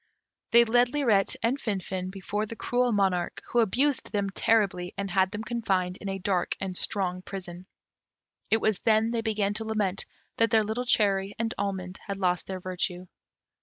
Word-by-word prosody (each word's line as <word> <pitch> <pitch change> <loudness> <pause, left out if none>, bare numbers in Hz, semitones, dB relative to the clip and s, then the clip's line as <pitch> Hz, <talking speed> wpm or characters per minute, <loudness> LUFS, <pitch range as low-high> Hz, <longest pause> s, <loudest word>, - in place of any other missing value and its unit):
They 235 0 +7
led 240 +2 +4
Lirette 225 -9 +2
and 245 +5 +1
Finfin 190 -4 -3
before 200 +3 -3
the 230 - -7
cruel 245 +2 +1
monarch, 190 -4 +1
who 240 - +3
abused 260 +6 +1
them 200 -2 -1
terribly, 195 -4 +1
and 200 -1 -3
had 190 0 +3
them 210 +2 -5
confined 195 -6 -1
in 200 - -6
a 195 - -2
dark 190 -1 0
and 190 -1 -4
strong 185 -2 -1
prison: 180 -1 -7 0.8
it 220 - +4
was 215 -3 +1
then 220 0 +3
they 235 -1 0
began 210 -3 0
to 215 +2 -2
lament 210 -4 -1 0.3
that 230 0 +3
their 220 -1 +4
little 225 +4 -3
cherry 200 -3 +2
and 225 0 -1
almond 190 -2 -3
had 200 -1 -3
lost 180 -3 0
their 190 -1 -4
virtue. 180 0 -3
200 Hz, 175 wpm, -27 LUFS, 185-225 Hz, 0.8 s, They